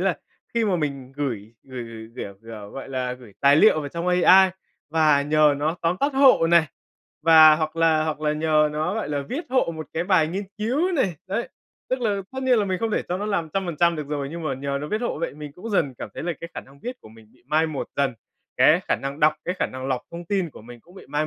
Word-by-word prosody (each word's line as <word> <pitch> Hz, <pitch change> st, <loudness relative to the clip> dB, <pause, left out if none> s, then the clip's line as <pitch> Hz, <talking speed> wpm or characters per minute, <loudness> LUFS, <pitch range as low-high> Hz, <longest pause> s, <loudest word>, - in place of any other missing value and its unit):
là -, -, +1 dB, 0.4 s
khi 230 Hz, -1 st, +2 dB
mà 195 Hz, -4 st, +1 dB
mình 140 Hz, -4 st, -4 dB
gửi 115 Hz, -6 st, -4 dB
gửi 130 Hz, -2 st, -7 dB
gửi, 115 Hz, -1 st, -10 dB
kiểu 100 Hz, -5 st, -6 dB
kiểu, 110 Hz, -3 st, -9 dB
gọi 135 Hz, -, -8 dB
là, 130 Hz, -2 st, -2 dB
gửi 125 Hz, -4 st, -12 dB
tài 140 Hz, +1 st, +6 dB
liệu 155 Hz, -2 st, +5 dB
vào 145 Hz, -, -5 dB
trong 170 Hz, +4 st, -5 dB
AI 185 Hz, +1 st, +6 dB, 0.4 s
và 155 Hz, -3 st, +3 dB
nhờ 150 Hz, 0 st, +4 dB
nó 155 Hz, +4 st, -1 dB
tóm 170 Hz, +2 st, +1 dB
tắt 280 Hz, 0 st, +1 dB
hộ 265 Hz, -11 st, +6 dB
này, 170 Hz, -1 st, +4 dB, 0.6 s
và 155 Hz, -1 st, +8 dB
hoặc 155 Hz, 0 st, -3 dB
là 160 Hz, -1 st, +3 dB
hoặc 155 Hz, -1 st, -3 dB
là 150 Hz, -1 st, +1 dB
nhờ 155 Hz, 0 st, +2 dB
nó, 155 Hz, +6 st, -1 dB
gọi 225 Hz, -, -3 dB
là, 145 Hz, -1 st, -2 dB
viết 310 Hz, +6 st, -4 dB
hộ 255 Hz, -10 st, +1 dB
một 155 Hz, -, -6 dB
cái 165 Hz, -, -2 dB
bài 180 Hz, -5 st, +3 dB
nghiên 195 Hz, +4 st, -3 dB
cứu 285 Hz, -, 0 dB
này, 210 Hz, -, +1 dB
đấy, 230 Hz, +5 st, -2 dB, 0.4 s
tức 255 Hz, 0 st, 0 dB
là 205 Hz, -4 st, 0 dB
tất 265 Hz, 0 st, -5 dB
nhiên 255 Hz, -3 st, +3 dB
là 210 Hz, -, +2 dB
mình 185 Hz, -2 st, -2 dB
không 225 Hz, +2 st, -1 dB
thể -, -, 0 dB
cho 180 Hz, -, -1 dB
nó 210 Hz, -, -3 dB
làm 175 Hz, -6 st, -1 dB
trăm 195 Hz, -1 st, -1 dB
phần 170 Hz, -3 st, -4 dB
trăm 170 Hz, 0 st, +3 dB
được 150 Hz, -2 st, -5 dB
rồi, 145 Hz, -2 st, -3 dB
nhưng 170 Hz, +1 st, -6 dB
mà 155 Hz, -, -2 dB
nhờ 140 Hz, +1 st, -3 dB
nó 150 Hz, -, -5 dB
viết 215 Hz, +5 st, -1 dB
hộ 235 Hz, -, -2 dB
vậy 165 Hz, -3 st, -3 dB
mình 150 Hz, -1 st, -9 dB
cũng 185 Hz, +9 st, -8 dB
dần 145 Hz, -10 st, +1 dB
cảm -, -, -6 dB
thấy -, -, -6 dB
là 175 Hz, +2 st, -1 dB
cái 170 Hz, -, -7 dB
khả -, -, -4 dB
năng 140 Hz, +1 st, -19 dB
viết 250 Hz, +1 st, -6 dB
của -, -, -14 dB
mình 110 Hz, 0 st, -17 dB
bị -, -, -27 dB
mai 155 Hz, +3 st, +2 dB
một 150 Hz, -4 st, -4 dB
dần, 140 Hz, -3 st, +1 dB, 0.4 s
cái -, -, +5 dB
khả -, -, +2 dB
năng 140 Hz, +2 st, -5 dB
đọc, 155 Hz, 0 st, +5 dB
cái 180 Hz, -, -2 dB
khả -, -, +1 dB
năng 130 Hz, 0 st, -7 dB
lọc 130 Hz, -2 st, -1 dB
thông 170 Hz, +1 st, -8 dB
tin 185 Hz, -3 st, -1 dB
của -, -, -13 dB
mình 120 Hz, +1 st, -12 dB
cũng 175 Hz, +9 st, -21 dB
bị 195 Hz, -, -13 dB
mai 150 Hz, +1 st, -1 dB
155 Hz, 270 wpm, -23 LUFS, 140-185 Hz, 0.6 s, và